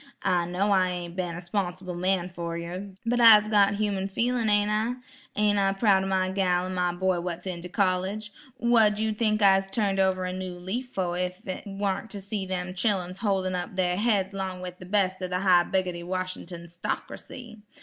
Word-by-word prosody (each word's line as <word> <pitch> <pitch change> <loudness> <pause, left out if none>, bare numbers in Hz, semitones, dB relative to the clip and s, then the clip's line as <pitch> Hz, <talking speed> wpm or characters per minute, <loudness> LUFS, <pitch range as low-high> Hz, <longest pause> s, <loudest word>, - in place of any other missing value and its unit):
I 175 -2 +2
know 190 +4 0
I 185 -2 +3
ain't 175 -1 -5
been 180 -2 -3
a 175 - -6
'sponsible 180 0 -3
man 180 0 0
fer 170 -2 -5
yer, 180 +3 -6
but 240 +1 +1
I'se 215 -2 +8
got 205 -1 +4
human 200 -2 -1
feelin', 230 +3 0
ain't 205 0 +3
I? 220 +3 0 0.4
Ain't 210 -1 +2
I 195 0 +2
proud 195 -2 +3
o' - - -2
my 185 -1 +1
gal 180 -2 +1
an' 185 - -4
my 180 -1 +1
boy 185 0 0
what's 175 0 -5
in 180 -2 -4
de 180 - -8
college? 195 +3 -1 0.2
Wha' 230 -3 +4
you 220 0 0
tink 215 -1 +1
I'se 195 -1 +5
turned 195 -1 0
over 190 -1 +2
a 180 - -3
new 185 -1 -5
leaf 200 +9 -4
fo' 180 -6 -2
ef 180 +1 -3
it 185 - -5
warn't 200 +2 -2
to 205 - -6
see 195 0 -4
them 180 -1 -3
chilluns 185 -2 -1
holdin' 190 -4 0
up 180 +1 -4
dar 180 -1 +1
heads 200 -2 +1
'long 190 -2 -4
wif 180 0 -7
de 185 - -9
bes' 190 -1 +1
ob 185 - -3
de 180 0 -1
high 180 -2 +5
biggotty 180 -2 -1
Wash'nt'n 185 -1 -5
'stockracy? 225 +7 -6
190 Hz, 205 wpm, -27 LUFS, 180-205 Hz, 0.4 s, I'se